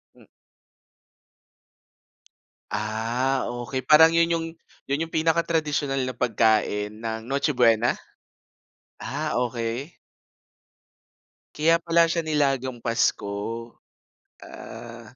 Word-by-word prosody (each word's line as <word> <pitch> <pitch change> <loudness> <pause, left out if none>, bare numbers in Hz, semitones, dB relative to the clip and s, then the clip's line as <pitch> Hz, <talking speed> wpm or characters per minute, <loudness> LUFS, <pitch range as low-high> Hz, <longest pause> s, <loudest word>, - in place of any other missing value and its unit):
Hm. - - -19 2.5
Ah, 115 +5 -1
okey. 120 +1 -4
Parang 160 +4 +7
'yon 165 0 +3
'yong 165 -1 0 0.4
'yon 140 +2 0
'yong 165 - -8
pinaka-tradisyonal 155 -3 0
na 130 - -5
pagkain 110 -3 +1
ng 110 -1 -3
Noche 140 +3 0
Buena? 120 -3 +3 1.1
Ah, - - -3
okey. 120 +5 -3 1.6
Kaya 165 +2 +4
pala 170 0 +3
siya, 165 0 -1
nilagang 135 -5 0
Pasko. 115 -3 0 1.1
Ah. 120 0 -11
130 Hz, 85 wpm, -25 LUFS, 115-160 Hz, 2.5 s, Parang